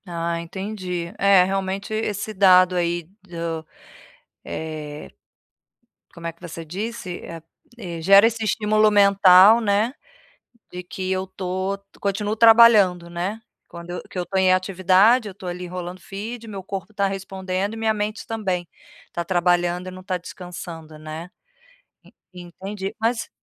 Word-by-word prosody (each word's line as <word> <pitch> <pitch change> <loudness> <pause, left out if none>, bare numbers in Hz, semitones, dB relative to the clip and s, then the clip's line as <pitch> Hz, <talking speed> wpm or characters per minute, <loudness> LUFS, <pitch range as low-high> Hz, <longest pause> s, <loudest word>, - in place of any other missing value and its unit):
Ah 170 -1 -3
entendi. 180 -1 -5
É 195 -2 +6
realmente 195 +2 -3
esse 215 -1 -3
dado 185 -2 +5
aí 175 0 0 0.2
do 170 -3 -5 0.8
eh, 155 -2 -6 1.0
como 170 -1 -11
é 165 - -3
que 170 - -34
você 165 -1 -8
disse? 190 +1 -5 0.6
Eh, 170 -7 -6
gera 195 +5 +7
esse 230 0 0
estímulo 215 0 +2
mental 200 +1 +7
né, 215 +3 +1 0.8
de 180 - -7
que 185 +1 -5
eu 190 0 0
estou 190 +1 -3 0.2
continuo 205 +2 -1
trabalhando 220 -6 +6
né? 180 +6 -4 0.3
Quando 170 0 -10
eu 180 - -5
que - - -7
eu 180 - -1
estou 190 +3 -2
em 185 -1 +4
atividade 190 +5 +3
eu - - -8
estou 185 -1 -9
ali 180 +1 -5
enrolando 180 0 -6
feed, 220 +5 -7
meu 200 -3 -7
corpo 190 +1 -6
está 200 -1 0
respondendo 195 0 -3
e - - -7
minha 220 -1 +1
mente 210 +1 -4
também 190 -6 -3 0.4
está 170 - -5
trabalhando 175 0 +1
e - - -5
não 185 0 -11
está 185 -1 -2
descansando 170 -3 -9
né. 155 +3 -8 1.0
Entendi 190 +3 -7
mas 230 +1 0
185 Hz, 145 wpm, -22 LUFS, 175-205 Hz, 1.0 s, gera